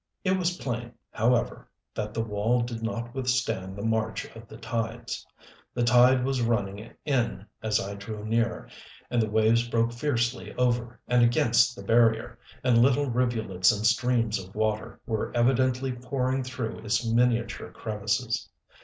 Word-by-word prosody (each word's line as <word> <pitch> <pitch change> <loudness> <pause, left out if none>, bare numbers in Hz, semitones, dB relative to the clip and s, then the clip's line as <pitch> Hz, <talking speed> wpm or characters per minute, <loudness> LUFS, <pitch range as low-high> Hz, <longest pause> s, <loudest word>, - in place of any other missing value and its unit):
It 185 0 +2
was 180 -1 0
plain, 120 -4 -4 0.2
however, 120 +2 0 0.2
that 105 -1 -3
the 115 +1 -2
wall 110 +3 +1
did 120 -1 -5
not 120 +1 -4
withstand 125 -8 -1
the 100 - -6
march 110 -2 -1
of 115 0 -11
the - - -11
tides. 115 0 -4 0.5
The 120 - +1
tide 125 +2 +5
was 135 -2 0
running 105 -2 -1 0.2
in 120 -8 0 0.2
as 110 -1 +1
I 100 +1 -4
drew 105 +1 -7
near, 115 0 0 0.4
and 120 -1 +2
the 110 - -1
waves 110 +2 +3
broke 115 0 +1
fiercely 120 -2 -1
over 120 -1 0
and 125 0 +3
against 120 0 +4
the 100 - -9
barrier, 115 +1 +2 0.2
and 120 -2 +4
little 135 +1 +3
rivulets 110 -7 +2
and 105 -1 -2
streams 115 -2 +2
of 95 +2 -15
water 110 0 -1
were 110 -2 -2
evidently 130 +1 +2
pouring 125 +1 -1
through 125 -3 -5
its 110 +1 -1
miniature 115 0 +1
crevices. 110 +2 -2
115 Hz, 155 wpm, -27 LUFS, 110-125 Hz, 0.5 s, tide